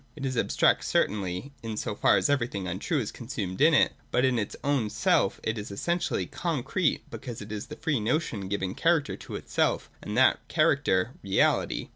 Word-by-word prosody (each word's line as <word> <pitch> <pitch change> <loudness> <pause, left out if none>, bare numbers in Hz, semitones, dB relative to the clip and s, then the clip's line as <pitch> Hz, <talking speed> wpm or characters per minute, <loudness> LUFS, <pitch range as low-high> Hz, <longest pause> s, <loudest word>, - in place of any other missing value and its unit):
It 140 -3 -5
is 130 -1 -2
abstract 115 - +2
certainly, 100 +5 -1
in 110 -2 -5
so 105 - -2
far - - +4
as - - +2
everything 120 -9 -1
untrue 95 - -2
is 110 -5 -3
consumed 115 -7 -5
in 155 +1 +6
it: - - +4 0.2
but 125 - +2
in 125 -3 +2
its 105 - -3
own 135 -6 +1
self - - +2
it 110 0 -1
is 105 - -6
essentially 170 - -1
con 165 -8 -2
crete, 180 +1 0
because 120 -4 -7
it 105 0 -9
is 105 0 -5
the - - -8
free 150 -6 -1
notion 110 - -1
giving 95 -1 -2
character 165 +1 +1
to - - -8
itself, - - -1
and - - -4
that - - +5
character, 95 +5 +2
reality. 100 -1 +1
115 Hz, 190 wpm, -28 LUFS, 100-145 Hz, 0.2 s, in